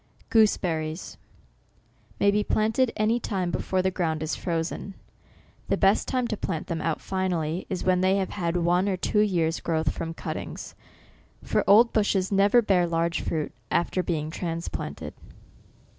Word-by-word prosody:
GOOSEBERRIES 170 -7 +1 1.0
may 200 - +4
be 210 +1 +1
planted 220 +4 +1
any 220 +3 +2
time 185 -6 -2
before 185 +1 -1
the 190 - +1
ground 160 -4 -1
is 155 - -2
frozen. 170 +3 -3 0.7
The - - +1
best 195 +1 +3
time 255 -2 0
to 215 - -1
plant 175 -5 -3
them 165 -2 -3
out 165 -1 -1
finally 180 -3 -2
is 185 - -3
when 185 -1 +2
they 190 +1 +3
have 190 -1 -1
had 175 -3 -1
one 175 +3 +2
or 190 - 0
two 210 - 0
years' 170 -6 +1
growth 160 -2 0
from 165 0 -5
cuttings; - - -6 0.7
for - - +1
old 230 +4 +7
bushes 200 -3 +1
never 205 +4 +4
bear 180 -4 +3
large 170 0 0
fruit 155 -2 -2 0.2
after 180 +2 +1
being 155 -3 -2
transplant 170 0 -4
ed. - - -6
185 Hz, 160 wpm, -26 LUFS, 165-200 Hz, 1.0 s, old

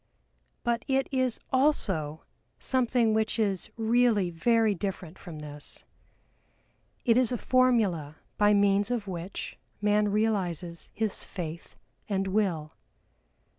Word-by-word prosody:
But 235 -1 0
it 270 0 +1
is 255 -3 +1
also 190 - +1 0.3
something 245 -3 +1
which 220 +1 0
is 200 -5 0
really 225 -4 +3
very 225 +5 +3
different 185 -2 -5
from 170 -4 -9
this. 150 -1 -8 1.2
It 230 -1 +4
is 255 -2 +3
a 245 - 0
formula 220 - +2 0.2
by 210 0 +4
means 200 +1 +3
of 240 -4 -1
which 180 +1 -6 0.2
man 210 0 +3
realizes 185 -6 -1
his 215 -2 -2
faith 170 -3 -7 0.3
and 195 -1 0
will. 180 -7 0
205 Hz, 115 wpm, -28 LUFS, 175-235 Hz, 1.2 s, It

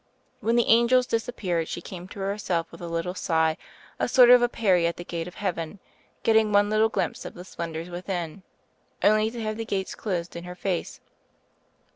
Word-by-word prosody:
When 230 +1 +1
the 240 - +4
angels 235 +2 +5
disappeared 200 -8 -1
she - - -4
came 180 +1 -9
to 195 - -9
herself 195 -4 -2
with - - -12
a 170 - -5
little 170 +2 -2
sigh, 160 -3 +1 0.4
a - - +1
sort 245 -1 +7
of 250 -1 +8
a 240 - +3
Peri 185 -8 +2
at 170 - -3
the 175 - -6
gate 170 -1 -4
of 180 - -10
heaven, 175 -2 -3 0.5
getting 220 -1 +4
one 205 0 +4
little 215 +1 +3
glimpse 200 -3 -2
of - - -8
the 180 - -9
splen 170 -3 -5
dors 165 +3 -6
within, 175 0 -4 0.6
only 215 +1 +4
to 235 +1 -7
have 215 0 -2
the 225 - -3
gates 195 -4 -3
closed 175 -5 -3
in 170 - -6
her 180 0 -8
face. 180 -1 -3
190 Hz, 200 wpm, -26 LUFS, 170-220 Hz, 0.6 s, of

